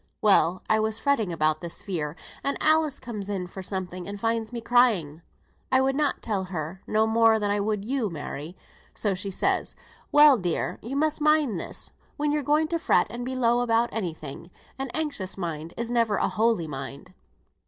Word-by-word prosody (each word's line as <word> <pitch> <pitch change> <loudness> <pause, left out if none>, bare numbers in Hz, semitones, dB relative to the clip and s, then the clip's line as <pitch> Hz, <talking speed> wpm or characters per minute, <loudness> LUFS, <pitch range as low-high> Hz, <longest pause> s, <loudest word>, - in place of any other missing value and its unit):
Well, 185 -3 +3
I 220 - +3
was 220 0 0
fretting 240 -10 +1
about 155 -1 +1
this 170 -1 -5
fear, 160 -6 -3 0.3
and 280 - -1
Alice 310 -2 +2
comes 210 -5 -6
in 190 -3 -2
for 190 +2 -8
something, 185 -2 -4
and 200 0 -6
finds 225 +1 -1
me 240 - -4
crying. 220 -11 +2 0.5
I 260 - +5
would 270 0 +2
not 295 -1 0
tell 200 -4 -1
her 180 0 -5
no 215 +1 +3
more 225 0 +4
than 205 -1 0
I 205 - +1
would 205 0 -1
you, 250 -3 -1
Mary; 155 +1 -6 0.4
so 205 -3 0
she 195 +2 -4
says, 190 - 0 0.4
'Well, 295 -4 +7
dear, 175 -3 -2
you 245 +5 -5
must 310 +1 +1
mind 300 - +3
this, - - -6 0.3
when 295 0 0
you're 300 0 +1
going 300 +3 +2
to 335 0 0
fret 180 - +3
and 240 +2 -5
be 260 +1 -3
low 240 -1 +3
about 235 0 +2
any 180 -8 -3
thing, 155 +3 -9 0.3
"An 270 -1 -3
anxious 280 -13 -2
mind 165 -3 -4
is 235 0 -3
never 230 -3 +2
a - - +1
holy 220 -5 +1
mind."' 140 +4 -7
215 Hz, 195 wpm, -26 LUFS, 180-255 Hz, 0.5 s, Well